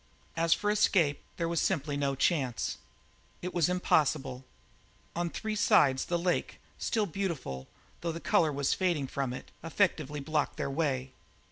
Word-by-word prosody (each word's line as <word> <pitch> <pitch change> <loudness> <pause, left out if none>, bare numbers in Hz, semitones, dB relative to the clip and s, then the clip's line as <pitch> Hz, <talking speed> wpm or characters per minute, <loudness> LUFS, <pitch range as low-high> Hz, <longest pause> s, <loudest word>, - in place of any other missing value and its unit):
As 165 0 +1
for 205 +4 +3
escape, 180 -8 +3 0.2
there 170 - 0
was 170 -1 0
simply 145 -1 0
no 140 -1 0
chance 135 -4 0 0.6
it 180 - -3
was 175 -2 +2
impossible. 150 -7 +1 0.7
On 175 0 0
three 220 +5 -3
sides 135 -10 +4
the 175 - 0
lake, 175 +1 -1 0.2
still 220 -3 +1
beautiful, 160 - -4 0.3
though 170 - -1
the 165 - -5
colour 160 -2 +3
was 140 -1 +1
fading 175 -7 +1
from 135 -1 -2
it, 125 - -8
effectively 160 -4 0
blocked 150 +1 -1
their 140 - -2
way. 135 -4 -1
155 Hz, 150 wpm, -30 LUFS, 140-175 Hz, 0.7 s, sides